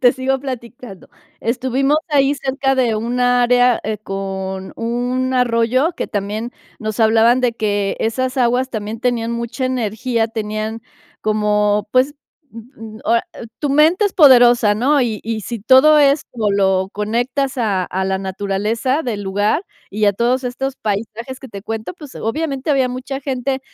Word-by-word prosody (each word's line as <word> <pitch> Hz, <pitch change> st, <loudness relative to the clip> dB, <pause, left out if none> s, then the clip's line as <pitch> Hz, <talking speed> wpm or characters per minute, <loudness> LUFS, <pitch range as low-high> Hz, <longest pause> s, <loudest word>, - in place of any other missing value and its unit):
te 245 Hz, -, +6 dB
sigo 265 Hz, 0 st, -1 dB
platicando. 245 Hz, -6 st, -8 dB, 0.3 s
Estuvimos 260 Hz, +4 st, 0 dB
ahí 280 Hz, -1 st, +3 dB
cerca 270 Hz, 0 st, -1 dB
de 245 Hz, -4 st, +1 dB
un 240 Hz, +3 st, -2 dB
área, 245 Hz, 0 st, +3 dB
eh, 215 Hz, -1 st, -2 dB
con 190 Hz, -1 st, -5 dB
un 245 Hz, +3 st, -1 dB
arroyo 250 Hz, +5 st, +2 dB
que -, -, -3 dB
también 210 Hz, +3 st, -4 dB, 0.3 s
nos 215 Hz, -1 st, -4 dB
hablaban 225 Hz, +3 st, +4 dB
de 245 Hz, -2 st, +1 dB
que 205 Hz, -3 st, -1 dB
esas 255 Hz, +4 st, -1 dB
aguas 250 Hz, +1 st, +1 dB
también 215 Hz, 0 st, -5 dB
tenían 235 Hz, -2 st, -1 dB
mucha 235 Hz, +3 st, -3 dB
energía, 230 Hz, -1 st, -1 dB
tenían 220 Hz, 0 st, -4 dB, 0.4 s
como, 210 Hz, -1 st, +1 dB
pues, 260 Hz, +3 st, +2 dB, 0.4 s
m 225 Hz, -1 st, -11 dB
o -, -, -1 dB
a 235 Hz, -, +3 dB, 0.4 s
tu 290 Hz, -, -2 dB
mente 320 Hz, +8 st, +4 dB
es 395 Hz, -, -5 dB
poderosa, 245 Hz, -, +6 dB
¿no? 270 Hz, +5 st, +2 dB
Y 220 Hz, -3 st, -2 dB
y 225 Hz, -1 st, -3 dB
si 235 Hz, 0 st, -5 dB
todo 265 Hz, +7 st, +6 dB
es 280 Hz, 0 st, +4 dB
o 220 Hz, -4 st, -1 dB
lo 190 Hz, -1 st, +1 dB
conectas 245 Hz, +6 st, -1 dB
a 200 Hz, -6 st, 0 dB
a 190 Hz, +2 st, -3 dB
la 190 Hz, -, 0 dB
naturaleza 205 Hz, +8 st, -1 dB
del 220 Hz, -6 st, -3 dB
lugar 205 Hz, -, 0 dB, 0.3 s
y 210 Hz, +1 st, 0 dB
a 200 Hz, -, +3 dB
todos 245 Hz, +4 st, 0 dB
estos 265 Hz, +2 st, -3 dB
paisajes 225 Hz, +5 st, -4 dB
que 265 Hz, -, -10 dB
te 200 Hz, -2 st, -8 dB
cuento, 225 Hz, -, -5 dB
pues 300 Hz, -6 st, -12 dB
obviamente 275 Hz, +3 st, -2 dB
había 265 Hz, -3 st, +2 dB
mucha 260 Hz, +2 st, -5 dB
gente 265 Hz, 0 st, -2 dB
235 Hz, 160 wpm, -18 LUFS, 215-260 Hz, 0.4 s, te